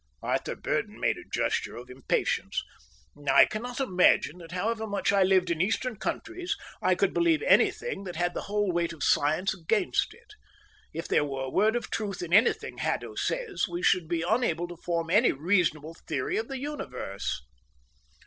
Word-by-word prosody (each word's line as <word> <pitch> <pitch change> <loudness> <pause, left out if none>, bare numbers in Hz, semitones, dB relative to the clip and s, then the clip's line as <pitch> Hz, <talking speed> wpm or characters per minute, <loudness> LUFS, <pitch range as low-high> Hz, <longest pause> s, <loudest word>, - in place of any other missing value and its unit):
Arthur - - -1
Burdon - - -2
made - - +1
a - - -14
gesture - - -1
of 120 +1 -9
impatience. 130 0 -1 0.7
"I - - +8
cannot 245 +4 -5
imagine 180 - +3
that, 165 -1 -11
however 220 +5 -2
much 200 -1 0
I 200 - +4
lived 185 -2 +3
in 165 -1 0
Eastern 225 +5 0
countries, 350 - -3 0.3
I - - +3
could - - +1
believe 340 +1 +2
anything 480 - +2
that 180 - -6
had 175 +1 0
the - - -3
whole 205 -2 +1
weight 170 -1 0
of 160 - -6
science 155 +7 +2
against 190 +4 0
it. 465 -3 -20 0.6
If 165 +1 -5
there - - +3
were 135 -2 -3
a 130 - -4
word 215 +4 +3
of 240 - -3
truth 200 -5 -3
in 175 0 -5
anything 225 +5 +3
Haddo - - -2
says, 470 - -1
we 175 0 -5
should 175 -3 +3
be 170 0 -1
unable 180 -7 +1
to 175 - -7
form 170 -1 -2
any 215 +6 +5
reasonable 160 -1 +1
theory 130 - -1
of 225 - -2
the 270 - -5
universe." 100 - -4
185 Hz, 175 wpm, -28 LUFS, 165-225 Hz, 0.7 s, I